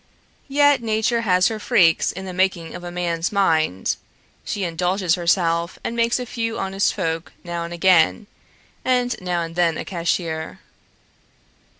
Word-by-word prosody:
Yet 285 Hz, -1 st, +4 dB
Nature 225 Hz, +1 st, 0 dB
has 185 Hz, -4 st, +3 dB
her 220 Hz, -1 st, -4 dB
freaks 170 Hz, -5 st, +3 dB
in 190 Hz, +2 st, -7 dB
the 185 Hz, -, -6 dB
making 180 Hz, -3 st, 0 dB
of 175 Hz, -, -8 dB
a 175 Hz, -, -5 dB
man's 175 Hz, -1 st, -2 dB
mind; 160 Hz, -, +1 dB, 0.5 s
she 200 Hz, -, -3 dB
indulges 180 Hz, +1 st, 0 dB
herself 170 Hz, -1 st, +1 dB
and 230 Hz, -, -3 dB
makes 235 Hz, 0 st, +2 dB
a 250 Hz, -, -4 dB
few 230 Hz, -1 st, -3 dB
honest 195 Hz, +1 st, 0 dB
folk 165 Hz, -3 st, -3 dB
now 170 Hz, -1 st, -4 dB
and 170 Hz, -, -8 dB
again, 175 Hz, +2 st, +3 dB, 0.6 s
and 250 Hz, -1 st, +1 dB
now 175 Hz, -2 st, -1 dB
and 165 Hz, 0 st, -7 dB
then 170 Hz, -2 st, +2 dB
a -, -, -5 dB
cashier. 165 Hz, -3 st, -2 dB
180 Hz, 155 wpm, -22 LUFS, 170-215 Hz, 0.6 s, Yet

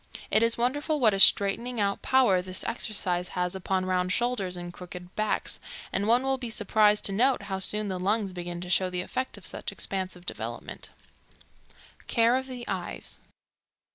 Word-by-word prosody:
It 215 Hz, -, +4 dB
is 230 Hz, 0 st, +3 dB
wonderful 290 Hz, +6 st, 0 dB
what 220 Hz, -5 st, +4 dB
a 195 Hz, -, -1 dB
straightening 225 Hz, +5 st, +4 dB
out 200 Hz, -1 st, 0 dB
power 245 Hz, -9 st, +3 dB
this 185 Hz, 0 st, -3 dB
exercise 190 Hz, -6 st, 0 dB
has 180 Hz, 0 st, 0 dB
upon 190 Hz, 0 st, -1 dB
round 185 Hz, 0 st, 0 dB
shoulders 210 Hz, -6 st, 0 dB
and 175 Hz, 0 st, -7 dB
crooked 180 Hz, 0 st, -10 dB
backs, 215 Hz, 0 st, 0 dB, 0.3 s
and 200 Hz, -, 0 dB
one 240 Hz, +3 st, +4 dB
will 270 Hz, 0 st, 0 dB
be 245 Hz, -2 st, -4 dB
surprised 210 Hz, -1 st, +3 dB
to -, -, +3 dB
note 245 Hz, +2 st, +2 dB
how 195 Hz, -1 st, -3 dB
soon 210 Hz, +2 st, +2 dB
the 185 Hz, -2 st, -3 dB
lungs 200 Hz, +1 st, 0 dB
begin 175 Hz, -1 st, -6 dB
to 180 Hz, -, -7 dB
show 185 Hz, 0 st, +3 dB
the 180 Hz, -1 st, -2 dB
effect 255 Hz, +8 st, -4 dB
of -, -, -13 dB
such -, -, -3 dB
expansive 185 Hz, -2 st, -3 dB
development. -, -, -6 dB, 1.2 s
Care 230 Hz, +1 st, +3 dB
of 260 Hz, 0 st, -2 dB
the 250 Hz, -2 st, -7 dB
Eyes. -, -, -4 dB
200 Hz, 175 wpm, -27 LUFS, 185-235 Hz, 1.2 s, It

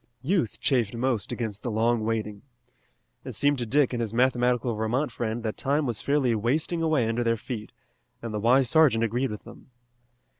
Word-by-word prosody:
Youth 160 Hz, -, 0 dB
chafed 120 Hz, -5 st, +1 dB
most 120 Hz, -4 st, -1 dB
against 110 Hz, -4 st, -4 dB
the 120 Hz, -, -3 dB
long 115 Hz, +1 st, +1 dB
waiting. 110 Hz, -2 st, -2 dB, 0.8 s
It -, -, -7 dB
seemed 145 Hz, -1 st, +2 dB
to 120 Hz, -, -3 dB
Dick 140 Hz, +2 st, +2 dB
and 120 Hz, -, -1 dB
his 115 Hz, -1 st, -3 dB
mathematical 125 Hz, -1 st, +2 dB
Vermont 115 Hz, +6 st, -1 dB
friend 115 Hz, 0 st, -3 dB
that 110 Hz, -1 st, -3 dB
time 145 Hz, +2 st, 0 dB
was 120 Hz, -5 st, -2 dB
fairly 140 Hz, -4 st, +1 dB
wasting 145 Hz, +10 st, 0 dB
away 155 Hz, -8 st, +2 dB
under 115 Hz, +2 st, 0 dB
their 115 Hz, -1 st, +1 dB
feet, 110 Hz, -1 st, -7 dB, 0.5 s
and 115 Hz, -2 st, -6 dB
the 105 Hz, -, -2 dB
wise 125 Hz, +4 st, +4 dB
sergeant 135 Hz, -7 st, +4 dB
agreed 120 Hz, +4 st, 0 dB
with 105 Hz, -, -7 dB
them. 115 Hz, +3 st, -14 dB
120 Hz, 185 wpm, -26 LUFS, 110-130 Hz, 0.8 s, wise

